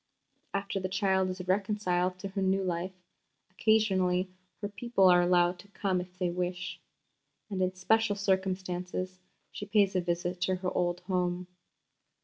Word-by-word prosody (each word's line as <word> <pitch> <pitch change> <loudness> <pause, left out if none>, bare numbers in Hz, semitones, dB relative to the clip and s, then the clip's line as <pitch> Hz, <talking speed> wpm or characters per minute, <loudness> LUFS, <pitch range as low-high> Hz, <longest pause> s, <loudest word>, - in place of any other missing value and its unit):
After 200 0 -2
the 185 0 -3
child 190 -1 +2
is 185 0 -5
reconciled 185 -2 +1
to 195 +1 -6
her 195 0 -3
new 190 0 +2
life, 180 +1 -2 0.6
occasionally 190 -3 +2 0.3
her 205 - -3
people 205 -1 +2
are 180 -1 +7
allowed 175 0 +3
to 200 - -13
come 195 -2 -1
if 180 0 -12
they 180 -2 0
wish; 180 0 -3 0.7
and 190 -2 -1
in 185 0 +1
special 215 +3 +2
circumstances 185 -2 -1 0.3
she 205 - -7
pays 205 -2 +3
a 185 - +3
visit 175 +1 -2
to 185 0 +2
her 185 0 -2
old 175 0 0
home. 180 -1 -1
185 Hz, 150 wpm, -30 LUFS, 180-195 Hz, 0.7 s, are